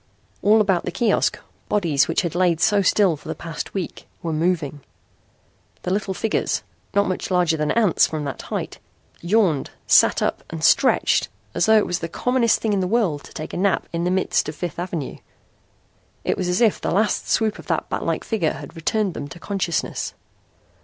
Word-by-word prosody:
All 215 +2 +5
about 190 -4 +2
the 180 - -2
kiosk 220 +4 +1 0.3
bodies 165 -9 +2
which 165 - +1
had 170 - -2
laid 175 -2 +2
so 205 +3 +3
still 190 -2 +3
for 150 - -14
the - - -3
past 165 +3 -6
week 185 -4 -5 0.2
were 165 -1 -2
moving. 155 -3 -1 1.0
The 180 - -1
little 195 -1 -2
figures, 225 - -1 0.3
not 200 0 +3
much 185 - -3
larger 180 -3 +2
than 150 -1 -1
ants 215 -7 +4
from 155 -2 -4
that 140 - -5
height, - - -5 0.4
yawned, 175 -6 +2 0.2
sat - - +5
up - - -1
and - - -6
stretched - - +3 0.2
as 170 - +1
though 220 0 +6
it 210 - +3
was 175 - -2
the 165 - -4
commonest 245 +3 +2
thing 220 -2 0
in 200 - +1
the 185 - 0
world 185 -9 +1
to - - -14
take 155 - -7
a - - -3
nap 190 +1 +1
in 170 0 -1
the 180 - +1
midst 185 -4 +1
of 150 - -6
Fifth 170 0 -5
Avenue. 175 -5 -4 1.1
It - - 0
was 180 - -2
as 180 +5 +1
if 225 -4 +3
the - - -1
last 210 +4 +1
swoop 220 -1 +1
of - - -12
that - - -1
batlike - - -2
figure 200 -9 0
had 145 +1 -10
returned 190 +4 0
them 145 - -5
to 170 - -11
consciousness. 185 -3 -2
180 Hz, 195 wpm, -22 LUFS, 165-205 Hz, 1.1 s, though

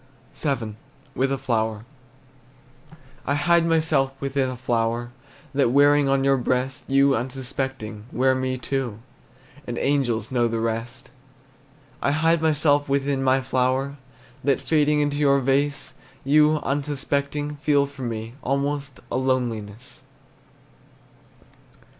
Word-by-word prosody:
VII. 120 -8 -3 0.4
WITH 135 +1 0
A 135 - 0
FLOWER. 110 -4 -1 1.4
I 140 - +2
hide 170 +1 +3
myself 155 -5 +2
within 135 -1 -1
my 130 - -5
flower, 120 -1 -1 0.4
That 135 -3 +3
wearing 145 +2 +4
on 135 0 +2
your 135 0 +3
breast, 130 +2 -1
You, 140 0 +4
unsuspecting, 130 -3 -4
wear 130 +1 +2
me 130 0 -1
too 130 -4 -3 0.7
And 120 -1 -4
angels 120 -6 0
know 120 -2 +2
the 115 0 -2
rest. 115 +2 -4 0.9
I - - +1
hide 160 +2 +2
myself 145 -2 +2
within 140 0 0
my 130 0 +3
flower, 130 +2 0 0.5
That, 140 -3 +2
fading 150 -1 +2
from 145 0 -3
your 140 -2 +4
vase, 135 +2 0 0.3
You, 150 +2 +4
unsuspecting, 145 +1 -2
feel 145 -1 +2
for 140 -1 -11
me 115 -2 -4
Almost 140 0 -2
a - - 0
loneliness. 125 -2 -2
135 Hz, 120 wpm, -24 LUFS, 125-145 Hz, 1.4 s, wearing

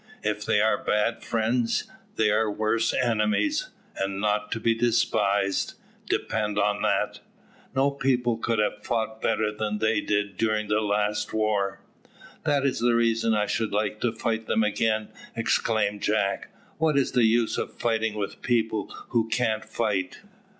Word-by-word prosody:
If 105 0 -1
they 105 - +3
are 110 -1 +2
bad 105 +2 +1
friends, 115 +1 0 0.3
they 110 -1 +3
are 110 0 +2
worse 110 +2 +1
enemies, 120 - +1 0.3
and 95 0 -2
not 105 0 0
to 115 - -3
be 115 +1 +2
despised, 105 -4 +1 0.3
depend 105 -2 -1
on 105 0 +1
that; - - 0 0.6
no 135 +2 +3
people 125 -4 +1
could 115 0 0
have 105 0 0
fought 110 -1 -2
better 110 -1 +1
than 105 0 -2
they 110 +1 +1
did 105 -2 -1
during 110 -1 0
the 105 0 +2
last 105 0 0
war." 105 -3 0 0.6
"That 145 -3 +2
is 135 - +1
the 120 0 +3
reason 115 -1 +2
I 105 -1 +2
should 105 0 -1
like 105 0 -1
to 120 - +1
fight 110 0 -2
them 110 - +2
again," 110 0 0 0.3
exclaimed 110 -2 0
Jack. 105 -2 0 0.3
"What 160 -3 +2
is 135 - +2
the 125 -2 +4
use 115 0 +2
of - - -4
fighting 115 -2 0
with 105 -2 -4
people 110 -4 0 0.2
who 115 -2 +1
can't 110 -3 0
fight?" 100 -5 -2
110 Hz, 155 wpm, -26 LUFS, 105-115 Hz, 0.6 s, the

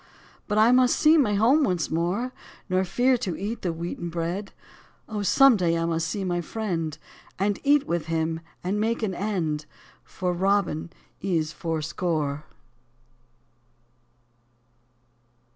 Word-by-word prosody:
But 210 - -1
I 220 +3 +6
must 250 0 +4
see 310 +1 +6
my 240 -10 +3
home 250 +9 +4
once 180 - 0
more. 180 +10 -1 0.4
Nor 185 +1 +2
fear 245 +7 +2
to 185 -7 -3
eat 210 +4 -4
the 175 - -1
wheaten 170 +1 -5
bread. 170 +4 -3 0.6
Oh, 210 -2 -3
some 270 +5 +6
day 170 -4 +1
I 165 - 0
must 165 -1 -1
see 200 -2 -3
my 175 -2 -1
friend. 170 -6 -3 0.4
And 200 +1 0
eat 290 0 +4
with 170 -2 -2
him, 160 0 -1 0.2
and 195 +3 -1
make 230 +2 0
an 200 -3 0
end, 170 -6 -2 0.4
For 180 -1 -3
Robin 190 -3 0 0.3
is 165 -5 0
fourscore. 155 -2 -2
185 Hz, 135 wpm, -25 LUFS, 165-215 Hz, 0.6 s, I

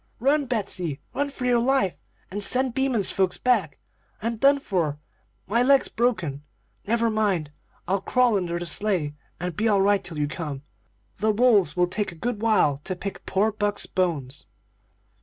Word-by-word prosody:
"'Run, 280 +3 +2
Betsey! 185 - -2
run 285 0 -1
for 265 -2 -6
your 245 -1 +3
life, 235 -7 +1 0.3
and 205 +2 -3
send 255 +4 +2
Beaman's 260 -6 +1
folks 190 -2 0
back! 215 - +1 0.4
I'm 230 +2 -2
done 280 +5 +5
for 175 - -1 0.5
my 230 +4 +1
leg's 270 +2 +4
broken. 185 - -1 0.5
Never 230 +1 +2
mind. 195 -9 0 0.4
I'll 190 +1 +1
crawl 250 +1 +2
under 175 -3 -1
the 175 - -4
sleigh, 170 -3 +1 0.3
and 180 -1 -4
be 220 - 0
all 200 -3 +3
right 200 0 +3
till 175 -4 -7
you 145 -1 0
come. 150 -3 -5 0.6
The 215 +2 +1
wolves 210 -8 +3
will 180 - +4
take 195 +3 -2
a - - -12
good 215 +6 -3
while 205 -11 +3
to 185 - -2
pick 195 +2 -7
poor 205 +3 +2
Buck's 205 -1 0
bones.' 150 -8 -2
205 Hz, 170 wpm, -25 LUFS, 175-235 Hz, 0.6 s, done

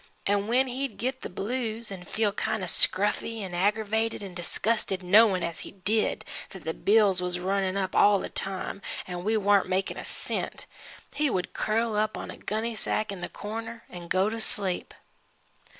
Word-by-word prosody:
An' 200 0 +1
when 250 +3 +4
he'd 265 +1 -3
git 255 +2 -2
the - - -5
blues, 225 +2 -3
'n' 180 -2 -7
feel 215 +2 +1
kind 220 0 -1
o' - - 0
scruffy, 205 +5 +1
'n' 185 -2 -6
aggravated 215 +4 +1
'n' 190 -2 -7
disgusted 190 +2 0
knowin' 195 0 +6
as 170 -1 -2
he - - -8
did, 205 +3 0 0.2
that 190 - -10
the 160 - -2
bills 200 -2 +4
was 180 0 -1
runnin' 190 +1 0
up 190 -1 -1
all 205 0 +6
the - - -3
time 195 +1 -3 0.2
an' 180 -1 -5
we 220 +3 +2
warn't 200 -2 +4
makin' 190 +1 0
a - - -5
cent - - -3 0.5
he 295 +1 +2
would 185 -6 -2
curl 225 +1 0
up 215 +1 +1
on - - -5
a - - -10
gunny 220 +2 -2
sack 215 -1 0
in 195 -3 -6
the - - -4
corner 225 +2 -6
an' 175 -1 -8
go 185 +3 +3
to 225 +1 -2
sleep. 190 -4 -1
205 Hz, 185 wpm, -28 LUFS, 185-225 Hz, 0.5 s, knowin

